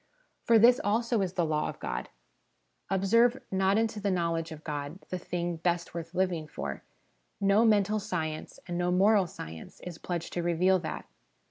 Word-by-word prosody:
For 230 - +6
this, 240 +3 +6
also, 230 +1 +1
is 185 -2 -1
the 175 -3 +1
law 155 -1 0
of - - -7
God. - - -4 0.8
Observe, 230 +7 +3
not 190 +1 +2
into 220 -1 0
the 205 0 -1
knowledge 165 -2 -1
of 155 -1 -9
God, 145 +1 -4
the 185 - -3
thing 175 -1 -3
best 170 +1 -1
worth 165 0 -6
living 180 -4 0
for: 70 - -5 0.6
no 200 +3 +4
mental 210 -1 +3
science, 160 -5 -4
and 175 -1 -3
no 175 0 +1
moral 195 +1 +4
science, 80 - -9
is 175 -2 -8
pledged 170 -2 -4
to 175 - -1
reveal 175 +2 +3
that. 170 - -5
180 Hz, 170 wpm, -29 LUFS, 165-205 Hz, 0.8 s, For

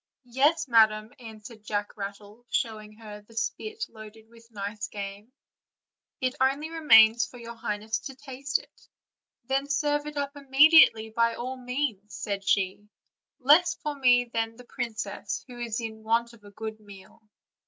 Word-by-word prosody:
"Yes, 275 +6 +2
madam," 220 -1 +3
answered 220 -1 -11
Jack 205 -1 -3
Rattle, 205 +2 -8
showing 215 -2 -2
her 215 -1 -11
the 220 +2 -20
spit 430 - -3
loaded 220 0 -13
with 230 0 -19
nice 210 0 -5
game; 200 +2 -8 0.9
"it 255 -2 0
only 280 +4 +1
remains 230 -8 +6
for 245 - -13
your 235 -1 -8
highness 220 -1 -3
to 270 -3 -9
taste 275 0 -3
it." - - -18 0.6
"Then 270 +3 -1
serve 290 +1 0
it 300 -1 -7
up 280 0 -3
immediately, 275 -5 +6
by 230 +1 +1
all 255 +2 -5
means," 250 -5 -3
said 200 -1 -4
she, 195 +1 0 0.5
"less 310 +6 +5
for 300 - -4
me 250 -3 +4
than 225 -1 -3
the 250 - -13
princess, 225 -5 -5
who 245 -1 -11
is 235 -1 -3
in 220 -1 -6
want 230 +2 0
of 220 -3 -18
a 205 - -13
good 220 +1 -7
meal." 200 0 -15
230 Hz, 155 wpm, -27 LUFS, 215-265 Hz, 0.9 s, remains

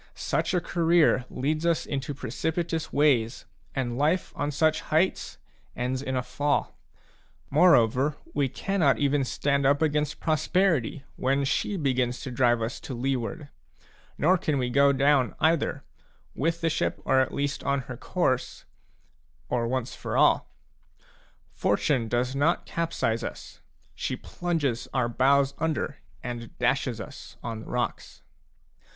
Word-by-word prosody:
Such - - -1
a - - +4
career 165 -6 +3
leads 155 +4 -1
us 170 -1 +1
into 140 0 -3
precipitous 160 +2 -2
ways, 130 -5 +2 0.3
and 125 -2 -2
life 160 +5 +1
on 145 - -1
such 155 +2 +2
heights 165 +5 0 0.4
ends 125 +1 -2
in 130 -1 -3
a 125 - 0
fall. 145 +4 -1 0.8
More 170 +5 +7
over, 130 +6 +2 0.2
we 140 -2 +1
cannot 165 -1 +1
even 145 0 +2
stand 140 +2 0
up 140 +1 +4
against 150 -2 0
prosperity 155 -4 +1
when 135 +2 +1
she 195 +8 0
begins 125 -5 0
to 130 - -5
drive 120 -2 +2
us 115 +3 -4
to 130 - -6
leeward; 135 +4 -2 0.7
nor 180 +4 +3
can 155 -5 0
we 125 -2 -1
go 140 +2 +5
down, 140 -3 +2
either, 160 0 +1
c - - -37 0.4
with 165 +3 0
the 165 - +2
ship 160 - -1
at 130 -1 +3
least 140 +1 -2
on 140 -1 0
her - - -8
course/ - - -1 0.8
or 120 -1 0
once 130 0 -2
for - - -4
all - - +3 0.5
a; - - -36 0.5
Fortune 125 -6 +1
does 125 +3 0
not 145 +5 +1
capsize 160 -9 -1
us, - - -8 0.2
— - - -38
she - - -3
plunges 155 -9 -2
our 120 - +2
bows 135 +3 +3
under 160 -1 0
b 140 - -15 0.3
and 120 -2 -6
dashes 125 -1 0
us - - -10
on 115 -2 -4
the 110 - -10
rocks. 120 0 -3
140 Hz, 150 wpm, -27 LUFS, 125-155 Hz, 0.8 s, More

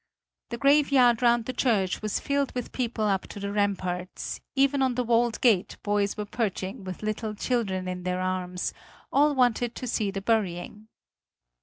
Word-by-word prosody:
The 235 - -4
graveyard 275 -4 +4
round 235 -1 +3
the 255 - -3
church 210 -8 +1
was 215 -1 -1
filled 280 -2 -1
with 250 - -4
people 235 -3 -2
up 195 -2 0
to - - -9
the 200 0 -3
ramparts; 185 -3 -2
even 275 0 +3
on 260 -2 +2
the 250 - 0
walled 235 -1 +2
gate 210 -5 +3
boys 205 0 0
were 210 - -3
perching 200 -3 -3
with 185 +1 -7
little 215 0 -3
children 200 -5 -1
in 180 0 -4
their 180 0 -2
arms; 185 -1 -2 0.4
all 290 +1 +4
wanted 245 -2 +2
to - - -5
see 220 -4 0
the 195 0 -3
burying. 210 -1 -1
215 Hz, 170 wpm, -27 LUFS, 190-245 Hz, 0.4 s, graveyard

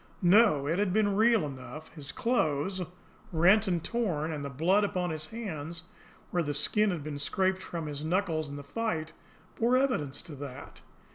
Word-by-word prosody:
No, 180 -6 +5
it 165 +6 0
had 205 -2 +1
been 205 -1 +2
real 220 -3 +4
enough; 140 +3 -8
his 145 -3 -7
clothes, 190 - 0 0.5
rent 190 +6 +5
and 175 -3 0
torn, 175 -10 -1
and 145 -2 -4
the 140 - -4
blood 175 +10 +2
upon 180 -4 -1
his 155 0 -3
hands, 170 -8 -5 0.5
where 175 - +1
the 145 -3 -2
skin 210 +8 +2
had 170 -6 -3
been 145 -1 -5
scraped 190 +5 +1
from 170 -3 -5
his 145 -1 -5
knuckles 160 -3 0
in 140 - -6
the 145 - -7
fight, 160 0 -3 0.4
bore 240 +3 +3
evidence 195 - 0
to 160 - -9
that. 135 -2 -9
170 Hz, 180 wpm, -30 LUFS, 150-205 Hz, 0.5 s, No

